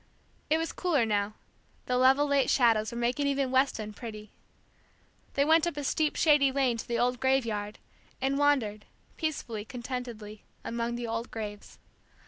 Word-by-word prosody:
It 315 - +4
was 325 0 -2
cooler 310 -10 +1
now, 205 -1 0 0.5
the 250 - 0
level 265 +3 +5
late 280 -2 +2
shadows 230 -3 +3
were 235 - -6
making 245 +4 0
even 275 -2 0
Weston 260 -5 +1
pretty. 215 -2 -9 1.0
They 280 - +3
went 320 +2 +4
up 340 - -3
a 290 - -3
steep 305 +2 0
shady 290 -4 +4
lane 260 -3 +1
to - - -7
the 235 - -1
old 250 0 +1
graveyard, 230 -6 0 0.4
and 270 +1 0
wandered, 240 -8 +1 0.3
peacefully, 260 -9 -3
contentedly, 235 -3 -6 0.2
among 235 0 -2
the 240 0 -4
old 230 +1 -3
graves. 210 -2 -7
250 Hz, 155 wpm, -29 LUFS, 225-280 Hz, 1.0 s, level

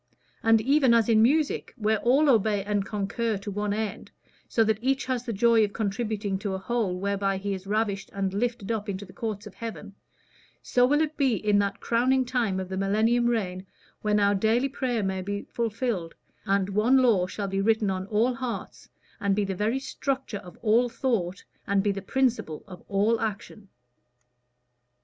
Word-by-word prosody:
And 225 -1 +4
even 265 0 +4
as 230 -1 +3
in 220 -1 +5
music, 290 +6 +1
where 215 -2 +1
all 275 +6 +3
obey 215 -5 +3
and 205 0 0
concur 210 +2 -2
to 200 +1 -6
one 205 +1 -2
end, 215 0 -3 0.4
so 225 - +3
that 220 -1 +1
each 270 +2 0
has 255 -2 -2
the 235 - -2
joy 230 +1 +4
of 205 -1 -1
contributing 210 -2 -2
to 195 -1 -3
a - - -2
whole 195 -3 -1
whereby 200 0 0
he 200 +1 -3
is 190 0 -7
ravished 205 -1 -1
and 195 -1 -2
lifted 230 0 -2
up 215 -2 -2
into 200 +1 -4
the 185 - -15
courts 215 -3 -4
of 210 - -10
heaven, 210 -1 -7 0.7
so 245 0 +3
will 290 +3 +3
it 310 -1 -2
be 265 -5 +2
in 210 -1 +2
that 200 0 -1
crowning 255 +3 +2
time 235 -7 0
of 185 - -4
the 190 0 -5
millennial 220 +5 +2
reign, 190 -6 -1 0.3
when 210 0 +2
our 200 0 +3
daily 225 +7 +2
prayer 245 -5 -1
will 190 -1 -1
be 200 +2 -4
fulfilled, 225 -6 -3 0.3
and 195 -1 +1
one 215 +6 +3
law 225 -9 +3
shall 200 +2 -4
be 195 0 -1
written 220 -1 +2
on 190 0 -3
all 225 +4 +2
hearts, 250 -1 -6 0.3
and 200 -1 +1
be 205 0 +1
the 195 - -2
very 210 +7 0
structure 270 -4 -3
of 180 -2 -13
all 235 +2 +3
thought, 230 -7 -2 0.2
and 200 -1 +2
be 205 - +2
the 195 0 -4
principle 245 - -1
of 180 -2 -11
all 210 +3 +2
action." 210 -1 -5
215 Hz, 190 wpm, -26 LUFS, 195-235 Hz, 0.7 s, in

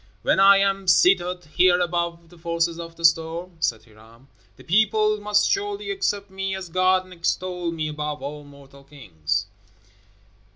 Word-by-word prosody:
"When - - +2
I 195 0 +7
am 195 -1 0
seated 180 +1 +3
here 175 +3 +3
above 170 -1 -2
the 175 - -17
forces 170 0 -1
of 165 0 -8
the 165 - -3
storm," 165 +2 +1
said 115 -8 -1
Hiram, 115 +4 -20 0.3
"the - - -15
people 215 +2 +2
must 210 0 +2
surely 410 +1 -2
accept 205 - -2
me 195 0 -3
as 190 -2 -7
God 185 +2 +2
and 185 0 -14
extol 180 0 -2
me 160 -2 -3
above 150 0 -5
all 145 +1 -6
mortal 140 -1 -16
kings." 95 - -4
170 Hz, 160 wpm, -23 LUFS, 150-190 Hz, 0.3 s, I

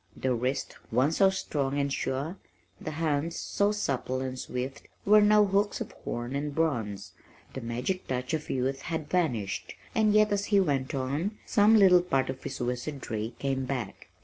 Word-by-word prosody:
The 130 -1 0
wrist, 125 +3 -2
once 130 +7 +2
so 195 -1 +6
strong 145 -7 -2
and 140 -1 0
sure, 140 +9 -2 0.4
the - - -5
hands 155 +1 -1
so 200 +1 0
supple 135 -10 -1
and 130 -1 -4
swift 125 +2 -5 0.2
were 210 +1 +7
now 210 0 +6
hooks 200 +1 +1
of - - -5
horn 120 +3 -5
and 145 0 -3
bronze. 115 -11 -1 0.4
The 130 - -5
magic 125 +11 -3
touch 125 +2 -2
of 155 -1 -2
youth 135 +1 -1
had 160 -1 -4
vanished, 125 - -1 0.2
and 215 -1 +3
yet 215 0 +4
as 205 0 +1
he 205 -2 +4
went 140 -7 0
on, 145 +11 -2
some 210 +2 +5
little 185 -3 +7
part 135 -7 0
of 130 - -10
his 140 - -5
wizardry 120 -3 -3
came 135 -1 -1
back. 125 -6 -4
140 Hz, 175 wpm, -28 LUFS, 130-185 Hz, 0.4 s, were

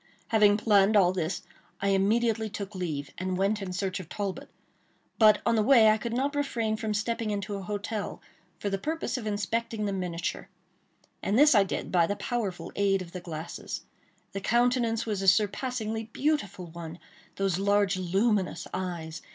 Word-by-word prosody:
Having 210 -2 +5
planned 210 -1 +4
all 180 -2 +5
this, 175 -1 -2 0.4
I 200 - 0
immediately 220 +3 +2
took 205 0 -6
leave, 155 -7 -4
and 185 0 -2
went 200 +2 +1
in 190 -2 -4
search 190 +1 -2
of 180 - -9
Talbot, 200 -2 -4 0.7
but, 215 -2 +6
on 230 +1 +3
the 220 - +3
way, 225 -1 +6
I 215 - +1
could 235 +1 -4
not 275 +4 0
refrain 235 -7 -1
from 215 -1 -2
stepping 230 +1 -1
into 205 0 -3
a 200 - -4
hotel, 205 +2 -4 0.4
for 200 - -3
the 195 - -1
purpose 320 +7 -2
of 240 -4 -4
inspecting 215 +1 -2
the 200 - -1
miniature; 180 0 -3 0.7
and 200 +3 +1
this 295 +2 +7
I 205 -3 +6
did 195 - -4
by 170 -2 +4
the 205 - -1
powerful 205 -3 -3
aid 195 -2 +2
of 170 - -13
the 180 - -6
glasses. 165 -1 -6 0.5
The 195 - -5
countenance 235 +1 +2
was 210 -3 -2
a 195 - -2
surpassingly 220 +3 +1
beautiful 225 - -1
one! 170 0 -8 0.4
Those 195 -2 0
large 200 -1 +2
luminous 190 +2 0
eyes! 170 -3 -4
205 Hz, 175 wpm, -28 LUFS, 185-225 Hz, 0.7 s, this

